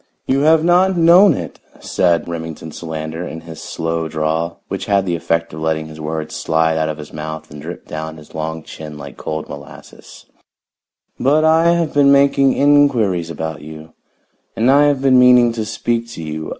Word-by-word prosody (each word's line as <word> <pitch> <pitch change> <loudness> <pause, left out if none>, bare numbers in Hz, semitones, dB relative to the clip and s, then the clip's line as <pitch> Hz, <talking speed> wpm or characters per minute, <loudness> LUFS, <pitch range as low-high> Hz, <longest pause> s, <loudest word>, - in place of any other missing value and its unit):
"You 135 +1 +1
have 155 +2 +4
not 180 +2 +3
known 175 +4 +6
it," - - -7 0.2
said 85 -3 0
Remington 80 -1 -6
Solander 80 +1 -6
in 80 - -8
his 80 -1 -10
slow 80 0 -3
drawl, 80 +2 -2
which - - -5
had 100 -1 +2
the 90 -2 -1
effect 85 0 -2
of 80 - -7
letting 80 0 -1
his 80 0 -10
words 80 0 -4
slide 80 0 +1
out 80 0 0
of 75 - -4
his 75 -1 -11
mouth 80 0 -7
and 75 0 -10
drip 85 +4 -8
down 80 0 -6
his 75 -1 -15
long 80 0 -4
chin 75 -1 -9
like 70 - -10
cold 80 0 -5
molasses, 70 -1 -12 0.9
"but 150 +4 +3
I 165 +2 +4
have 170 -2 -1
been 140 -1 +5
making 140 -1 +4
inquiries 125 - +2
about 80 -1 -5
you, 80 +1 -11 0.6
and 120 +4 +3
I 145 +1 +5
have 140 -2 +1
been 130 -2 +5
meaning 125 -1 +6
to 115 -2 -4
speak 115 +2 -2
to 85 - -7
you. 80 0 -5
85 Hz, 185 wpm, -18 LUFS, -, 0.9 s, known